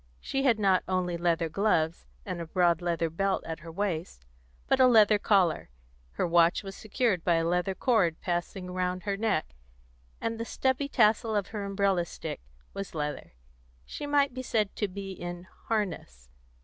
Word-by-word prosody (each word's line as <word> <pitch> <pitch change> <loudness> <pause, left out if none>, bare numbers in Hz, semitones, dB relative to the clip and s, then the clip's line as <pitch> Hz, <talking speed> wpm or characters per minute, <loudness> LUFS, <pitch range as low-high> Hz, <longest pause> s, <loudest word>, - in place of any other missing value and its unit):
She 270 - -2
had 255 -5 +3
not 195 -3 +3
only 185 -2 0
leather 170 -1 +1
gloves, 165 - 0 0.2
and 170 - -4
a 165 - -6
broad 175 -1 +2
leather 170 -1 0
belt 195 +4 -1
at 160 0 -5
her 165 +1 -10
waist, 170 - -3 0.4
but - - +2
a 260 - +7
leather 215 -3 +6
collar; 185 - +2 0.4
her - - 0
watch 170 +1 +3
was 195 0 -7
secured 215 -5 0
by 175 - +3
a 165 0 +1
leather 180 +3 0
cord, 190 -11 +2
passing 180 +1 -3
round 180 0 -2
her 200 -1 -1
neck, 200 - -1 0.7
and 225 0 -3
the - - -1
stubby 265 +3 0
tassel 220 -3 +3
of 200 -2 -1
her 210 -2 -4
umbrella 195 -3 +1
stick 160 - -7 0.3
was 195 -3 -6
leather: 150 - -4 0.5
she 290 - -6
might 285 -2 +2
be 255 - -4
said 215 -5 -1
to 210 - 0
be 195 0 -7
in 175 -1 -7 0.2
harness. 165 - -3
185 Hz, 175 wpm, -28 LUFS, 170-215 Hz, 0.7 s, a